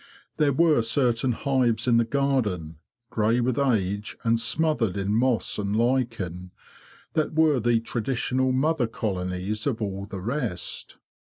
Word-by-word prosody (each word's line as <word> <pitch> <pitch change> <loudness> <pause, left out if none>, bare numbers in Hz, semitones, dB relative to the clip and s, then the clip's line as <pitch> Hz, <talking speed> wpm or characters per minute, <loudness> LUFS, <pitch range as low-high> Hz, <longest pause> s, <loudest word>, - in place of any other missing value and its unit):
There 150 -2 +3
were 155 -2 +4
certain 120 +1 +1
hives 130 -3 0
in 120 -2 +5
the 115 - +3
garden, 110 - -1 0.3
grey 115 +1 +2
with 125 +1 0
age 105 -6 0
and 115 0 +2
smothered 115 - 0
in 100 +1 -1
moss 115 -3 +1
and 100 0 -1
lichen, 115 -7 -1 0.6
that 155 0 0
were 155 -4 +4
the 115 0 +2
traditional 130 +2 -1
mother 135 0 +1
colonies 95 0 -3
of 125 -5 -1
all 100 -2 -4
the 100 - -6
rest. 115 - -4
115 Hz, 140 wpm, -25 LUFS, 105-130 Hz, 0.6 s, in